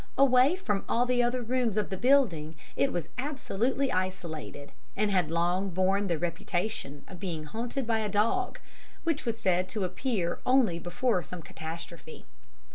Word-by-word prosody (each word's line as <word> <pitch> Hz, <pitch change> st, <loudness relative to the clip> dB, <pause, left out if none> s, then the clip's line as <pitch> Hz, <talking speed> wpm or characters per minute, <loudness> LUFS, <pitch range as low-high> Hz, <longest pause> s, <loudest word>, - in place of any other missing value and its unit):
Away 270 Hz, +3 st, +6 dB
from 290 Hz, -, -1 dB
all 240 Hz, +1 st, +3 dB
the 250 Hz, 0 st, +2 dB
other 245 Hz, +1 st, +1 dB
rooms 240 Hz, -3 st, 0 dB
of 210 Hz, -1 st, 0 dB
the -, -, 0 dB
building, 190 Hz, -, +3 dB, 0.2 s
it 140 Hz, -, +2 dB
was 170 Hz, -3 st, -3 dB
absolutely 265 Hz, -1 st, 0 dB
isolated; 170 Hz, -6 st, -3 dB, 0.3 s
and 210 Hz, 0 st, +2 dB
had 180 Hz, -5 st, +2 dB
long 175 Hz, +4 st, +1 dB
borne 190 Hz, +3 st, +2 dB
the 170 Hz, -3 st, +1 dB
reputation 175 Hz, -2 st, -2 dB
of 185 Hz, -, -10 dB
being 165 Hz, -5 st, -3 dB
haunted 235 Hz, -, -3 dB
by 225 Hz, -1 st, +1 dB
a 215 Hz, -1 st, -1 dB
dog, 225 Hz, -, +1 dB, 0.5 s
which 325 Hz, -4 st, 0 dB
was 230 Hz, -1 st, -1 dB
said 185 Hz, -3 st, +1 dB
to 210 Hz, -3 st, -2 dB
appear 185 Hz, -2 st, -1 dB
only 250 Hz, -10 st, +3 dB
before 180 Hz, +4 st, 0 dB
some 170 Hz, +2 st, -8 dB
catastrophe. 160 Hz, +1 st, -8 dB
195 Hz, 160 wpm, -29 LUFS, 175-245 Hz, 0.5 s, Away